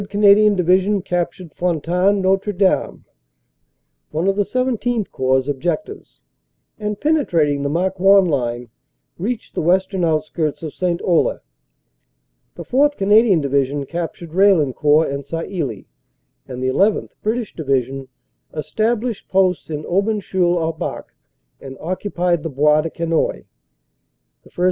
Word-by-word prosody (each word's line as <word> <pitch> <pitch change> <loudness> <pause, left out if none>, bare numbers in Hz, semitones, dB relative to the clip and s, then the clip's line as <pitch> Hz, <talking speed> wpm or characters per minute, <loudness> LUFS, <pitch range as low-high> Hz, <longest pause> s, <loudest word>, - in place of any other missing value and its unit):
Canadian 205 +1 +5
Division 185 +2 +2
cap 175 -1 -1
tured 180 -4 -13
Fontaine 180 +3 +1
Notre 195 +2 +1
Dame 190 0 0 1.0
(one 160 +5 -2
of 195 - +2
the 205 - +2
XVII 245 -1 -1
Corps 130 0 +1
objectives), 175 - -4 0.6
and, 210 -1 -3
penetrating 170 - +1
the 140 - -1
Marcoing 190 +3 +3
line, 120 -5 -2 0.5
reached 220 +5 -4
the - - -2
western 185 +2 +1
outskirts 155 -1 -1
of 155 - -5
St. 175 -2 -1
Olle. 185 - +2 1.2
The - - -7
4th. 290 +3 +2
Canadian 205 -2 +4
Division 140 0 0
cap 170 +2 -4
tured 170 -2 -11
Raillencourt 155 -6 +3
and 140 0 -4
Sailly, 155 - -4 0.6
and 125 0 -6
the 130 - +1
llth. 200 +10 +1
(British) 225 0 -2
Divi 135 -5 0
sion 135 +2 -8 0.5
established 220 +7 -2
posts 185 -3 +1
in 150 -1 -4
Aubencheul 190 -2 0
au 165 0 0
Bac 160 - -6 0.5
and 135 -1 -10
occupied 180 -1 -1
the 165 - -4
Bois 150 +2 +3
de 165 - -4
Quesnoy. 165 - -1 1.0
The - - -20
1st. - - -14
175 Hz, 130 wpm, -19 LUFS, 150-200 Hz, 1.2 s, Canadian